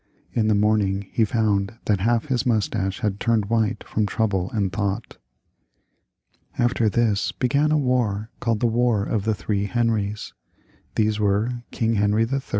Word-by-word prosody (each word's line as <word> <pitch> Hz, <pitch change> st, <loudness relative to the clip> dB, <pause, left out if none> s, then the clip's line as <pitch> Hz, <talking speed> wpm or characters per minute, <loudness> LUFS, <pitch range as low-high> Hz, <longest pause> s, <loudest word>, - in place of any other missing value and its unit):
In 110 Hz, -2 st, +1 dB
the 110 Hz, -, +3 dB
morning 100 Hz, -2 st, +1 dB
he 115 Hz, -, +2 dB
found 105 Hz, -1 st, 0 dB
that 105 Hz, -3 st, +2 dB
half 115 Hz, +5 st, +1 dB
his 130 Hz, -5 st, 0 dB
moustache 105 Hz, -3 st, -1 dB
had 105 Hz, -3 st, -1 dB
turned 115 Hz, -3 st, 0 dB
white 110 Hz, -2 st, +1 dB
from 105 Hz, -1 st, -1 dB
trouble 95 Hz, -3 st, 0 dB
and 100 Hz, -4 st, -1 dB
thought. 100 Hz, +1 st, -3 dB, 1.4 s
After 120 Hz, -2 st, +2 dB
this 105 Hz, -4 st, +1 dB
began 140 Hz, -, +1 dB
a 155 Hz, -, +4 dB
war 120 Hz, -6 st, 0 dB
called 115 Hz, -3 st, -1 dB
the -, -, +2 dB
War 120 Hz, -2 st, +2 dB
of 105 Hz, -2 st, -1 dB
the 110 Hz, -1 st, +1 dB
Three 100 Hz, -1 st, -2 dB
Henries. 105 Hz, -2 st, -1 dB, 0.6 s
These 110 Hz, -1 st, +1 dB
were 105 Hz, +4 st, 0 dB
King 115 Hz, -2 st, 0 dB
Henry 105 Hz, +2 st, +2 dB
III. 135 Hz, +4 st, -1 dB
110 Hz, 155 wpm, -23 LUFS, 100-115 Hz, 1.4 s, a